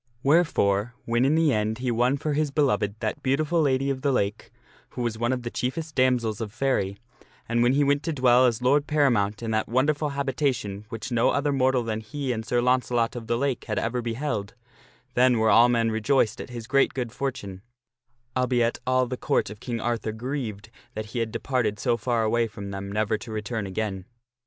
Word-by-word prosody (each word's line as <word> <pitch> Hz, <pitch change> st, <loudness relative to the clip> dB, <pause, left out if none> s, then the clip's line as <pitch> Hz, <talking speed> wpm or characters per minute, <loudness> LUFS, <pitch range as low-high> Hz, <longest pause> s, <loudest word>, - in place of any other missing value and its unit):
Wherefore, 120 Hz, -, +2 dB
when 120 Hz, +2 st, +2 dB
in 145 Hz, +3 st, +3 dB
the 160 Hz, -3 st, +3 dB
end 110 Hz, +1 st, 0 dB
he 125 Hz, 0 st, -1 dB
won 125 Hz, +4 st, +2 dB
for 150 Hz, +1 st, -2 dB
his 150 Hz, 0 st, +1 dB
beloved 125 Hz, -8 st, +1 dB
that 110 Hz, -2 st, -2 dB
beautiful 155 Hz, +5 st, +1 dB
Lady 135 Hz, -1 st, +1 dB
of 130 Hz, -1 st, -4 dB
the 140 Hz, 0 st, +1 dB
Lake, 105 Hz, -4 st, -1 dB, 0.4 s
who 125 Hz, -, -5 dB
was 115 Hz, -2 st, -2 dB
one 120 Hz, +2 st, +1 dB
of 125 Hz, -2 st, -2 dB
the 120 Hz, -, -4 dB
chief 125 Hz, +4 st, -2 dB
est 160 Hz, -1 st, -5 dB
damoiselles 120 Hz, -4 st, +1 dB
of 110 Hz, -2 st, -4 dB
Faery, 110 Hz, -5 st, 0 dB, 0.5 s
and 120 Hz, 0 st, +1 dB
when 120 Hz, +2 st, +4 dB
he 145 Hz, +1 st, +3 dB
went 145 Hz, 0 st, +2 dB
to 165 Hz, -, -2 dB
dwell 125 Hz, -3 st, +4 dB
as 120 Hz, 0 st, -1 dB
lord 140 Hz, +3 st, +3 dB
paramount 120 Hz, -9 st, +1 dB
in 115 Hz, -, -2 dB
that 110 Hz, 0 st, 0 dB
wonderful 145 Hz, +5 st, +1 dB
habitation 130 Hz, -7 st, -2 dB
which 115 Hz, +4 st, -6 dB
no 120 Hz, 0 st, +3 dB
other 145 Hz, +1 st, +1 dB
mortal 130 Hz, -2 st, +2 dB
than 110 Hz, -1 st, -2 dB
he 130 Hz, +5 st, -4 dB
and 110 Hz, -2 st, -4 dB
Sir 120 Hz, -1 st, +2 dB
Launcelot 125 Hz, -2 st, +1 dB
of 115 Hz, -2 st, -7 dB
the 115 Hz, -, +1 dB
Lake 135 Hz, -1 st, -1 dB
had 105 Hz, -2 st, -3 dB
ever 120 Hz, +2 st, -1 dB
beheld, 115 Hz, -3 st, -3 dB, 0.6 s
then 125 Hz, 0 st, +4 dB
were 110 Hz, 0 st, +3 dB
all 120 Hz, +2 st, +7 dB
men 115 Hz, -2 st, +2 dB
re 110 Hz, 0 st, -2 dB
joiced 130 Hz, -1 st, +2 dB
at -, -, -9 dB
his 120 Hz, -2 st, -7 dB
great 140 Hz, +3 st, +2 dB
good 125 Hz, -3 st, -3 dB
fortune 115 Hz, -8 st, -5 dB, 0.7 s
albeit 125 Hz, -2 st, +1 dB
all 130 Hz, 0 st, +3 dB
the 125 Hz, +1 st, -5 dB
Court -, -, 0 dB
of 105 Hz, -, -10 dB
King 120 Hz, -1 st, -4 dB
Arthur 115 Hz, -1 st, -2 dB
grieved 115 Hz, -3 st, -5 dB, 0.2 s
that 110 Hz, 0 st, -5 dB
he 120 Hz, -, -1 dB
had 115 Hz, -1 st, -1 dB
departed 120 Hz, -6 st, -1 dB
so 120 Hz, +2 st, +1 dB
far 115 Hz, 0 st, 0 dB
away 115 Hz, +1 st, +1 dB
from 100 Hz, -2 st, -8 dB
them 100 Hz, 0 st, -5 dB
never 110 Hz, +1 st, 0 dB
to 115 Hz, -, -9 dB
return 110 Hz, -1 st, -3 dB
again. 95 Hz, -1 st, -3 dB
120 Hz, 210 wpm, -25 LUFS, 110-135 Hz, 0.7 s, all